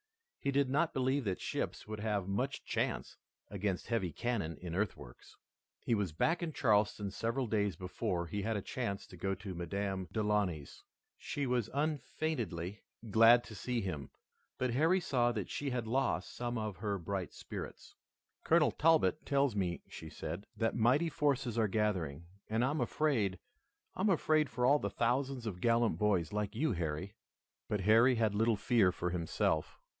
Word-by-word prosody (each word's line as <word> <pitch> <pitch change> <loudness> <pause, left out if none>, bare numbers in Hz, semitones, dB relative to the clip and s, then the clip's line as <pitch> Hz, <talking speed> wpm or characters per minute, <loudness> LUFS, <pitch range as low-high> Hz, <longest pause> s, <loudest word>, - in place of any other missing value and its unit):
He 140 - -1
did 140 0 +3
not 160 +4 +1
believe 130 +1 +1
that 95 -3 -1
ships - - -3
would 110 0 -5
have 105 -3 -1
much 125 +8 -2
chance - - -2 0.4
against 100 -2 -2
heavy 100 -7 0
cannon 100 -5 -2
in 90 -2 -6
earthworks. 90 - -4 0.5
He - - +2
was 100 -6 0
back 165 - +1
in 170 -2 -2
Charleston 105 -7 +2
several 115 +5 -1
days 105 -4 0
before 90 0 -2
he 100 +4 -3
had 110 +1 -1
a 100 - -4
chance 100 -6 -3
to - - -13
go 95 +3 -1
to 95 0 -7
Madame 95 +2 -3
Delaunay's. 105 -8 -1 0.4
She 145 - -3
was 125 -3 0
unfeignedly 130 - -2 0.3
glad 115 +3 +7
to 120 -3 -10
see 120 +3 -2
him, 75 - -4 0.5
but 125 -2 0
Harry 165 +8 +4
saw 125 -8 +2
that 105 -5 -4
she 145 - -2
had 125 -3 -2
lost 130 +3 0
some 120 0 -2
of 110 -3 -3
her 105 -1 -2
bright 95 -2 -3
spirits. - - -8 0.5
"Colonel 160 -2 +4
Talbot 160 -1 +3
tells 140 -4 +2
me," 90 -4 -1
she 80 - -9
said, 95 +5 -6
"that 115 -1 +1
mighty 125 +9 +3
forces 135 -6 0
are 110 - +3
gathering, 90 -8 -1 0.2
and 110 +3 +2
I 135 - +1
am 150 -2 -1
afraid, 120 -8 +1 0.6
I - - -3
am 205 - +3
afraid 155 -4 +3
for 125 +1 0
all 145 +3 +5
the - - -2
thousands 125 +1 0
of 90 -5 -4
gallant 115 0 +2
boys 95 -6 +1
like 105 -1 -2
you, 155 -1 +1
Harry." 85 +1 -3 0.6
But 105 -2 0
Harry 115 +6 +6
had 110 -3 +2
little 110 +2 +3
fear 105 -3 +3
for 90 0 -3
himself. 80 -2 0
110 Hz, 170 wpm, -34 LUFS, 95-130 Hz, 0.6 s, glad